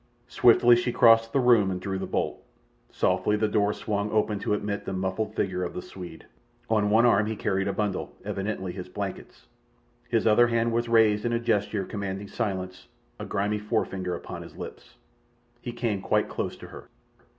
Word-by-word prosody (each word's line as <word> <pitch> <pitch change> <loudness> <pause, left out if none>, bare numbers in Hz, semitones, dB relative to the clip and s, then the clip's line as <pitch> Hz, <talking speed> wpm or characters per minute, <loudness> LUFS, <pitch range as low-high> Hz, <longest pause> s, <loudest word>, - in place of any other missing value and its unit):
Swiftly 120 0 +6
she 120 +1 0
crossed 115 -1 +5
the 135 - +2
room 120 -6 +4
and 90 -1 -3
drew 95 -1 -3
the - - -4
bolt. - - -2 0.5
Softly 105 - +1
the 110 +1 +1
door 105 -1 +2
swung 105 0 -3
open 105 -1 +1
to 105 - 0
admit 100 0 -3
the - - -4
muffled 95 +4 -2
figure 90 -1 -1
of 90 - -5
the 90 - -4
Swede. 90 -3 -10 0.5
On 105 -2 +2
one 110 +3 +5
arm 110 -3 +4
he 110 - -2
carried 95 -1 -1
a - - +1
bundle, 105 -2 -2
evidently 95 -2 -3
his 90 0 -8
blankets. 100 0 -7 0.6
His 115 -2 +1
other 115 +2 +5
hand 115 0 +1
was 120 +1 -1
raised 110 -2 +4
in 120 - 0
a 115 - +1
gesture 105 -3 0
commanding 100 -1 -5
silence, 95 -4 -4 0.3
a - - -5
grimy 105 +2 -1
forefinger 95 -4 -2
upon - - -7
his - - -12
lips. - - -9 0.7
He 120 - -5
came 115 -5 -2
quite - - +1
close - - -4
to - - -11
her. - - -11
105 Hz, 185 wpm, -26 LUFS, 95-115 Hz, 0.7 s, Swiftly